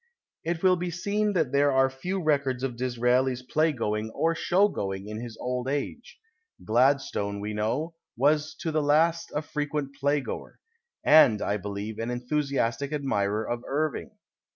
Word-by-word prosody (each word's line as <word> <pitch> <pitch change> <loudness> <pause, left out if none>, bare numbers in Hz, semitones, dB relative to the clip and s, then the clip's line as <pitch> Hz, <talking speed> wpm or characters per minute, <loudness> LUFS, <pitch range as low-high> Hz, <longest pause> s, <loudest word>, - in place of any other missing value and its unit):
It 170 +1 -2
will 185 -1 +5
be 175 0 -3
seen 205 +5 -1
that 160 -8 +1
there 140 0 +3
are 135 0 +4
few 175 +8 -4
records 140 -4 +1
of 130 -3 -2
Dis 125 0 -3
raeli's 125 +1 +2
playgoing 115 -8 0
or 165 0 +2
show 185 +4 +3
going 95 - -4
in 110 +1 -5
his 120 -2 -8
old 125 0 -2
age. 145 - -4 0.5
Gladstone, 120 -4 +1
we 105 +1 -4
know, 120 +11 -1 0.2
was 150 +4 +2
to 160 - -1
the 155 0 +1
last 160 +3 +2
a 150 - 0
frequent 150 -1 -3
playgoer 145 0 -1 0.3
— 475 - -62
and, 145 -9 +6
I 105 0 0
believe, 105 +2 -5
an 115 +1 -2
enthusiastic 135 +1 -1
admirer 110 -7 -1
of 120 0 -2
Irving. 155 +2 -1
135 Hz, 160 wpm, -27 LUFS, 120-155 Hz, 0.5 s, and